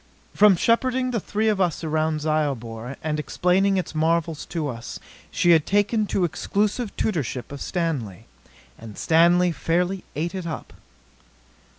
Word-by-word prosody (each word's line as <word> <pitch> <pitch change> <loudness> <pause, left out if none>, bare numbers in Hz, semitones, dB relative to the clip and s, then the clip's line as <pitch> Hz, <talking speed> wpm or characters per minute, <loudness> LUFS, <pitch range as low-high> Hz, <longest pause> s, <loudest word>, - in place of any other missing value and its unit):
From 210 -2 +6
shepherding 255 +6 +1
the 235 - 0
three 215 +3 -1
of 210 -3 +2
us 175 -3 0
around 155 0 0
Zyobor 135 -6 -2
and 155 -1 -1
explaining 190 +5 +1
its 185 - -3
marvels 160 0 0
to 160 -4 -3
us, 120 -3 -6 0.3
she 175 - +3
had 160 -3 +4
taken 205 +2 +2
to 190 - 0
exclusive 205 - -1
tutorship 135 - -2
of 140 - -7
Stanley. 145 - -3 0.5
And 110 -2 -10
Stanley 175 +2 +4
fairly 175 +5 -1
ate 165 +4 -2
it 185 -3 -5
up. 160 - -6
170 Hz, 145 wpm, -24 LUFS, 150-195 Hz, 0.5 s, From